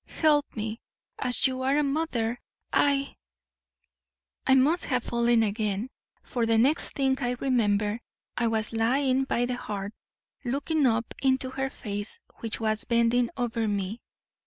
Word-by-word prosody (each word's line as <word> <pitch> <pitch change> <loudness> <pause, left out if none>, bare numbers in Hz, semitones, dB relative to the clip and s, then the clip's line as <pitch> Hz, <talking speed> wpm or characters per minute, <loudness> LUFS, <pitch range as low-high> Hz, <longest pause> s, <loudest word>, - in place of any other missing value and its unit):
Help 300 -2 +2
me, 220 +1 -4 0.4
as 245 - +2
you 260 -1 0
are 270 +2 +2
a 300 - +3
mother 275 -6 -1 0.3
I 280 -1 +2 0.6
' 60 -1 -24
"I 265 - +6
must 295 +7 +3
have 250 -3 0
fallen 235 -1 +2
again, 215 +2 -1 0.3
for 235 -2 -1
the 225 0 +3
next 270 +8 +2
thing 265 -1 +2
I 245 0 0
remember 215 -4 +1 0.4
I 235 - +1
was 225 0 0
lying 260 +4 +2
by 245 -2 0
the 245 0 -3
hearth, 205 -3 -5 0.5
looking 280 +3 +1
up 230 0 0
into 260 -1 +1
her 270 0 -2
face, 205 -5 -5 0.2
which 225 -2 -4
was 215 -1 +3
bending 235 +1 +2
over 230 -2 -1
me. 205 +2 -2
240 Hz, 150 wpm, -27 LUFS, 220-265 Hz, 0.6 s, I